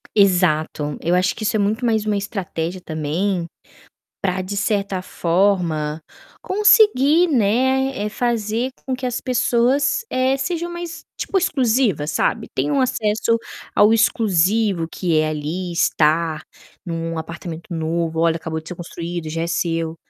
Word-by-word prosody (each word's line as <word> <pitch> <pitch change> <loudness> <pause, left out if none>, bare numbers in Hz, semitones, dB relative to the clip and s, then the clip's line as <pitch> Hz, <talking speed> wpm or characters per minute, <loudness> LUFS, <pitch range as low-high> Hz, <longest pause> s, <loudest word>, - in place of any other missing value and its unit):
Exato, 165 -7 +2
eu 170 - 0
acho 185 +1 +2
que 220 - -6
isso 215 +1 0
é - - +2
muito 215 +4 0
mais 220 -2 +2
uma 210 -1 +1
estratégia 185 -3 -4
também, 170 +4 -1 0.8
pra 185 -1 -1
de 200 +2 -4
certa 200 -2 -1
forma, 170 -4 0 0.4
conseguir, 375 - +5
né, 260 +2 +2
eh, 205 +1 -2
fazer 235 +1 -1 0.2
com 260 - -1
que 255 0 -4
as 245 -1 -2
pessoas, 255 - +2
eh, 260 +1 +2
sejam 340 +5 -3
mais 345 -1 -6
tipo 390 - 0
exclusiva, 250 - +1
sabe. 150 -1 0
Tenham 285 -2 +1
acesso 230 -2 +1 0.4
ao 210 +1 +6
exclusivo 205 -4 +2
que 170 -4 0
é 155 0 +2
ali 155 +4 -3
estar 160 -1 +1 0.4
em 170 - -4
um 165 0 -3
apartamento 165 +1 -7
novo, 165 0 -1
olha 165 0 +3
acabou 160 -1 -4
de 160 - -13
ser 180 - -6
construído, 170 -1 -6
já 165 +1 -2
é - - -1
seu. 165 -1 -1
195 Hz, 145 wpm, -21 LUFS, 165-240 Hz, 0.8 s, ao